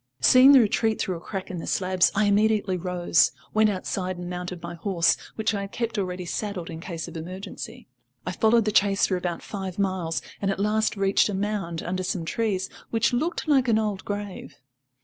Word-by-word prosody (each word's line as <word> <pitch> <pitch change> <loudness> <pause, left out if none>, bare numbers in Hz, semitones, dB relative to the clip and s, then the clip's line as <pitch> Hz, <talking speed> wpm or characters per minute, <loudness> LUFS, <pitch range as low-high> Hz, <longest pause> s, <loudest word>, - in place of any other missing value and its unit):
Seeing 255 - +7
the 270 - +9
retreat 220 0 +2
through 185 -2 -1
a - - -12
crack 190 0 -6
in 180 - -5
the - - -7
slabs, 185 -1 +2
I 210 +1 +3
immediately 205 -1 +2
rose, 175 -5 +2 0.2
went 215 0 +4
outside 185 -1 -3
and 175 0 -6
mounted 180 0 -5
my 170 0 -5
horse, 170 0 +2 0.2
which 220 0 0
I 200 - -2
had 200 0 -6
kept 230 -1 -2
ready 185 -3 -3
saddled 185 -2 -4
in 160 - -7
case 165 -2 -6
of - - -10
emergency. 185 +4 -7 0.4
I - - -2
followed 225 0 +3
the 215 - +1
chase 200 -1 +3
for 190 - 0
about 175 -2 -3
five 190 -3 -6
miles, 185 -4 -1 0.2
and 195 - 0
at 195 - -1
last 215 +1 +1
reached 195 +1 +3
a 205 - -2
mound 195 -5 -2
under 185 +1 -2
some 180 -2 -2
trees, 200 -1 -1 0.2
which 230 +2 +1
looked 315 +7 -1
like 270 -4 +3
an 225 -2 +4
old 210 -3 -1
grave. 205 -7 -6
195 Hz, 205 wpm, -25 LUFS, 180-215 Hz, 0.4 s, the